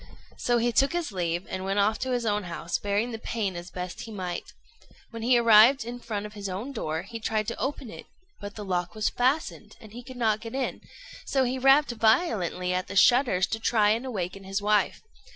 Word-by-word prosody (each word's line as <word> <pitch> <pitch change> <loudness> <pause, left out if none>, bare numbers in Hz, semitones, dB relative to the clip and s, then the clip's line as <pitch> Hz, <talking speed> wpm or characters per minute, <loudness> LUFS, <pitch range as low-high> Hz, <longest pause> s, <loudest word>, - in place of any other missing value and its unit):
So 240 0 +1
he 240 +1 +1
took 270 +7 +2
his 345 -7 -2
leave, 175 -1 -2
and 185 0 -5
went 195 +1 -1
off 210 +2 +2
to 260 - -3
his 245 -2 -1
own 210 -2 0
house, 170 0 -3
bearing 205 +4 -1
the 225 - -6
pain 215 -5 -3
as 175 +1 -7
best 180 +1 -6
he 225 - -8
might. 185 -4 -5 0.6
When 230 -1 -7
he 245 +2 +4
arrived 230 +2 +6
in 240 +1 -6
front 210 -3 -4
of 210 - -9
his 200 -2 -6
own 205 +9 -5
door, 160 - -3
he 230 - -8
tried 215 -1 -1
to 235 - -6
open 270 -3 -3
it; - - -11 0.3
but 205 -1 -8
the 210 - -7
lock 180 0 -2
was 215 -1 0
fastened, 265 +6 -1
and 215 -3 -14
he 245 - -8
could 255 +1 -11
not 220 -3 +1
get 230 +2 -7
in, 270 -1 -2 0.5
so 270 -1 +2
he 255 +1 -1
rapped 270 +1 +5
violently 220 - +1
at 185 +1 -2
the - - -7
shutters 240 -3 +4
to 220 - -2
try 215 -2 +3
and 225 +3 0
awaken 195 -6 -4
his 195 +1 -2
wife. 210 -1 +1
220 Hz, 225 wpm, -27 LUFS, 195-245 Hz, 0.6 s, arrived